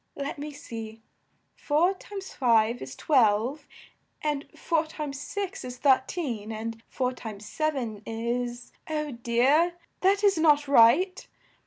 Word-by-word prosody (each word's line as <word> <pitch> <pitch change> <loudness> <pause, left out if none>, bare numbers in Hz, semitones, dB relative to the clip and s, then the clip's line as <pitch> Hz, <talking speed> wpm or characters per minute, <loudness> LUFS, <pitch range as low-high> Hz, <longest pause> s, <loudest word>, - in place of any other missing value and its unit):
Let 280 +1 -4
me 295 +1 -5
see: 225 -6 -8 0.5
four 325 +6 +2
times 390 0 -9
five 230 -2 +3
is 130 0 -7
twelve, 250 - +2 0.6
and 295 -1 -1
four 325 -2 0
times 295 -3 -5
six 395 -2 -4
is 250 0 -7
thir 265 -1 +5
teen, 235 - -4
and 225 +1 -5
four 255 -1 -1
times 215 -4 -8
sev 310 +4 -1
en 225 -6 -4
is 240 +2 -3 0.2
oh 300 -1 -2
dear! 260 +8 +2 0.2
that 395 +2 +3
is 395 -5 +4
not 295 -2 +4
right. 285 +9 +5
275 Hz, 140 wpm, -27 LUFS, 230-310 Hz, 0.6 s, thir